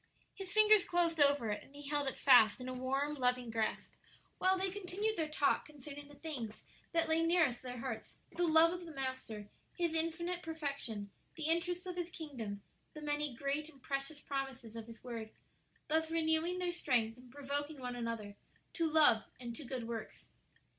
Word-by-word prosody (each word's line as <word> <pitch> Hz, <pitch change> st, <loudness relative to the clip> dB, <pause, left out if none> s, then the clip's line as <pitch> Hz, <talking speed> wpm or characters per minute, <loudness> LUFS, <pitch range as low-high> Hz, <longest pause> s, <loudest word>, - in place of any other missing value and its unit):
His 390 Hz, -1 st, -5 dB
fingers 430 Hz, -1 st, +7 dB
closed 340 Hz, -2 st, +1 dB
over 280 Hz, -6 st, +4 dB
it, 210 Hz, -, -2 dB
and 280 Hz, -, -19 dB
he 290 Hz, 0 st, -9 dB
held 290 Hz, -1 st, 0 dB
it 265 Hz, -, -2 dB
fast 245 Hz, -5 st, +7 dB
in 250 Hz, -, -6 dB
a 255 Hz, -, -3 dB
warm, 270 Hz, +3 st, 0 dB
loving 250 Hz, -3 st, +1 dB
grasp, 225 Hz, -1 st, -1 dB, 0.5 s
while 375 Hz, +1 st, +4 dB
they 380 Hz, 0 st, 0 dB
continued 410 Hz, +3 st, -1 dB
their 320 Hz, -2 st, -1 dB
talk 300 Hz, -2 st, +2 dB
concerning 290 Hz, -1 st, -9 dB
the 290 Hz, -, -14 dB
things 270 Hz, -8 st, -6 dB, 0.3 s
that 330 Hz, -1 st, +2 dB
lay 320 Hz, +1 st, +3 dB
nearest 330 Hz, -7 st, +3 dB
their 250 Hz, -1 st, -6 dB
hearts 230 Hz, -, -5 dB, 0.2 s
the 350 Hz, -1 st, +2 dB
love 320 Hz, +1 st, +6 dB
of 355 Hz, -1 st, -6 dB
the 325 Hz, -, -8 dB
Master, 260 Hz, -6 st, -4 dB, 0.3 s
His 340 Hz, -2 st, +1 dB
infinite 335 Hz, +2 st, -1 dB
perfection, 280 Hz, -, -4 dB, 0.2 s
the 315 Hz, -, -5 dB
interests 340 Hz, +3 st, +1 dB
of 360 Hz, -1 st, -5 dB
His 350 Hz, -1 st, -2 dB
kingdom, 235 Hz, -, -6 dB, 0.3 s
the 305 Hz, -, -7 dB
many 295 Hz, -3 st, -1 dB
great 280 Hz, +4 st, -1 dB
and 280 Hz, -4 st, -17 dB
precious 275 Hz, +3 st, -3 dB
promises 270 Hz, -6 st, -4 dB
of 225 Hz, -1 st, -6 dB
His 230 Hz, 0 st, -12 dB
word 230 Hz, -3 st, -5 dB, 0.6 s
thus 320 Hz, +1 st, +2 dB
renewing 325 Hz, +2 st, +1 dB
their 360 Hz, -1 st, 0 dB
strength 240 Hz, -9 st, +1 dB
and 250 Hz, 0 st, -15 dB
provoking 285 Hz, +2 st, -3 dB
one 250 Hz, -1 st, -4 dB
another 230 Hz, -4 st, -4 dB, 0.4 s
to 330 Hz, -2 st, +1 dB
love 300 Hz, -8 st, +6 dB
and 240 Hz, -2 st, -5 dB
to 305 Hz, -, -6 dB
good 250 Hz, -3 st, -4 dB
works. 230 Hz, -2 st, -6 dB
290 Hz, 185 wpm, -35 LUFS, 250-330 Hz, 0.6 s, fingers